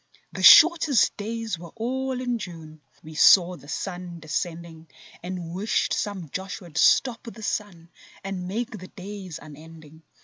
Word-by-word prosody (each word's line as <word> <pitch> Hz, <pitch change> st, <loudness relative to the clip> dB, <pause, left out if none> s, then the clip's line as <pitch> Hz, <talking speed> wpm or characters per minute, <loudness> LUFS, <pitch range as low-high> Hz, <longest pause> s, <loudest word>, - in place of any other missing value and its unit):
The -, -, -6 dB
shortest 320 Hz, -7 st, +7 dB
days 220 Hz, -3 st, -4 dB
were 170 Hz, 0 st, -10 dB
all 260 Hz, +3 st, -3 dB
in 245 Hz, -2 st, -2 dB
June; 160 Hz, -5 st, -10 dB, 0.2 s
We 155 Hz, -, -11 dB
saw 180 Hz, +3 st, +6 dB
the 145 Hz, -, -16 dB
sun 175 Hz, 0 st, -6 dB
descending 165 Hz, 0 st, -5 dB, 0.3 s
And 175 Hz, -2 st, -6 dB
wished 200 Hz, +5 st, 0 dB
some 195 Hz, -7 st, -3 dB
Joshua'd 185 Hz, -4 st, -6 dB
stop 245 Hz, -3 st, +3 dB
the 220 Hz, -, -12 dB
sun 175 Hz, -6 st, -4 dB, 0.3 s
And 190 Hz, -2 st, -5 dB
make 230 Hz, +6 st, -3 dB
the 190 Hz, -5 st, -9 dB
days 190 Hz, -4 st, -9 dB
unending. 155 Hz, +1 st, -14 dB
185 Hz, 140 wpm, -25 LUFS, 165-220 Hz, 0.3 s, shortest